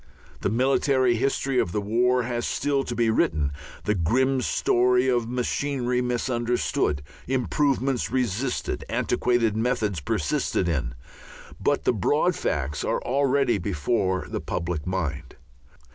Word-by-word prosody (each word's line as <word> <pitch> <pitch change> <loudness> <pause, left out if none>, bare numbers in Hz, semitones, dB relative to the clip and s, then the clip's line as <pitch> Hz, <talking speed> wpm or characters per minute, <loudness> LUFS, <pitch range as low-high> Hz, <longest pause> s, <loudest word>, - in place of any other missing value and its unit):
The - - 0
military 130 +1 +2
history 135 +2 0
of 85 - 0
the - - 0
war 120 +4 +2
has 120 0 -2
still 140 -1 0
to 120 - -4
be 115 -1 +2
written, 75 -9 +1 0.3
the 105 - +1
grim 130 +9 +1
story 125 +1 +2
of 120 -3 +1
machinery 125 0 -1
misunderstood, 120 - 0 0.2
improvements 130 - 0
resisted, 125 0 -1
antiquated 120 -3 +1
methods 110 -5 0
persisted 80 +5 -1
in; 65 -8 -1 0.6
but - - +1
the - - +2
broad 145 - +2
facts 70 0 -2
are - - -1
already 135 -3 +2
before 95 +2 0
the - - -4
public 85 -3 -3
mind. 80 -6 -3
120 Hz, 125 wpm, -25 LUFS, 95-130 Hz, 0.6 s, military